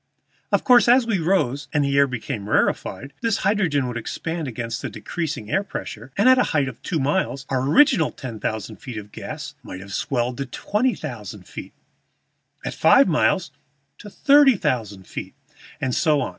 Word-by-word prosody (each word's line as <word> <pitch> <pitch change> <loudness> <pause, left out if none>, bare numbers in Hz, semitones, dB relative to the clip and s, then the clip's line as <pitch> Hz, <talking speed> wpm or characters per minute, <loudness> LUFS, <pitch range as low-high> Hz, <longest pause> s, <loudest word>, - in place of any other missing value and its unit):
Of - - +2
course 245 -2 +6
as 245 +1 +5
we 220 -5 0
rose 155 -6 0
and 145 -1 +1
the 140 0 0
air 140 0 +5
became 115 -4 -5
rarefied 135 +5 0
this 225 -3 +1
hydrogen 180 -10 +2
would 120 -1 -4
expand 165 +6 -4
against 115 -1 -4
the - - -4
decreasing 155 -11 -5
air 195 - +2
pressure, 135 - -7
and 200 - +4
at 260 0 +7
a 205 - +1
height 140 -2 +2
of 125 - -8
two 165 - -2
miles 140 -1 -1
our 130 -2 0
original 270 - +5
ten 120 -6 -8
thousand 110 0 -4
feet 125 -4 -8
of 105 -1 -8
gas - - -7
might 90 - -8
have 100 +1 -9
swelled 125 -2 -1
to 140 - -3
twenty 215 - 0
thousand - - -8
feet, - - -9 0.9
at - - -3
five 275 - +5
miles 170 0 +1 0.5
to 205 - -10
thirty 280 +3 +5
thousand 105 - -2
feet, - - -7 0.4
and 130 -2 -1
so 150 +2 +3
on. - - -1
145 Hz, 185 wpm, -23 LUFS, 120-195 Hz, 0.9 s, at